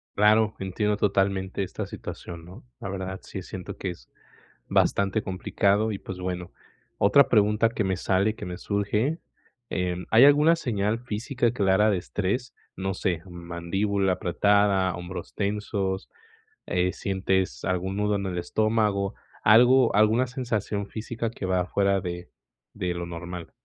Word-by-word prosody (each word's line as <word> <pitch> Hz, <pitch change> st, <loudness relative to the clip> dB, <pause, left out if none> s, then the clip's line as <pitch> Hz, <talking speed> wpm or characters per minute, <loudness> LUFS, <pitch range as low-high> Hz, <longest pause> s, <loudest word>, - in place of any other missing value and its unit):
Claro, 105 Hz, +1 st, +4 dB
entiendo 105 Hz, +2 st, 0 dB
totalmente 95 Hz, -2 st, 0 dB
esta 95 Hz, -, -4 dB
situación, 85 Hz, -1 st, -8 dB
¿no? 90 Hz, +2 st, -12 dB, 0.2 s
La -, -, -6 dB
verdad, 95 Hz, -1 st, -4 dB
sí 95 Hz, -, -7 dB
siento 95 Hz, +2 st, -7 dB
que 95 Hz, -, -3 dB
es 85 Hz, -8 st, -10 dB, 0.6 s
bastante 100 Hz, +2 st, +2 dB
complicado 100 Hz, +3 st, +1 dB
y, 100 Hz, -, -4 dB
pues, 95 Hz, -1 st, -8 dB
bueno. 90 Hz, -1 st, -4 dB, 0.5 s
Otra 140 Hz, +7 st, +6 dB
pregunta 105 Hz, 0 st, +3 dB
que 115 Hz, -1 st, -2 dB
me 95 Hz, -2 st, 0 dB
sale, 95 Hz, +3 st, +1 dB
que 105 Hz, -, -7 dB
me 90 Hz, -1 st, -5 dB
surge, 105 Hz, -, -1 dB, 0.5 s
eh, 90 Hz, -1 st, -1 dB
¿hay 115 Hz, +3 st, +7 dB
alguna 150 Hz, +4 st, +6 dB
señal 110 Hz, -7 st, -1 dB
física 120 Hz, +1 st, -1 dB
clara 100 Hz, -2 st, +3 dB
de 100 Hz, -, +2 dB
estrés? 105 Hz, +7 st, -2 dB, 0.2 s
No 95 Hz, +1 st, -2 dB
sé, 90 Hz, -3 st, -1 dB
mandíbula 95 Hz, +3 st, -1 dB
apretada, 95 Hz, +1 st, +2 dB
hombros 90 Hz, +1 st, -7 dB
tensos, 100 Hz, -2 st, -2 dB, 0.6 s
eh, 90 Hz, 0 st, +1 dB
sientes 95 Hz, -1 st, -1 dB
algún 95 Hz, +1 st, -1 dB
nudo 105 Hz, 0 st, +1 dB
en 100 Hz, -1 st, -2 dB
el 90 Hz, -1 st, -3 dB
estómago, 105 Hz, 0 st, 0 dB, 0.3 s
algo, 120 Hz, +2 st, +6 dB
alguna 110 Hz, +4 st, +4 dB
sensación 115 Hz, -5 st, -2 dB
física 115 Hz, +1 st, -4 dB
que 110 Hz, -, -6 dB
va 90 Hz, -1 st, +1 dB
fuera 100 Hz, +1 st, +1 dB
de 90 Hz, -1 st, -6 dB, 0.5 s
de 90 Hz, -1 st, -2 dB
lo 85 Hz, 0 st, -4 dB
normal. 85 Hz, 0 st, -7 dB
100 Hz, 145 wpm, -26 LUFS, 95-110 Hz, 0.6 s, hay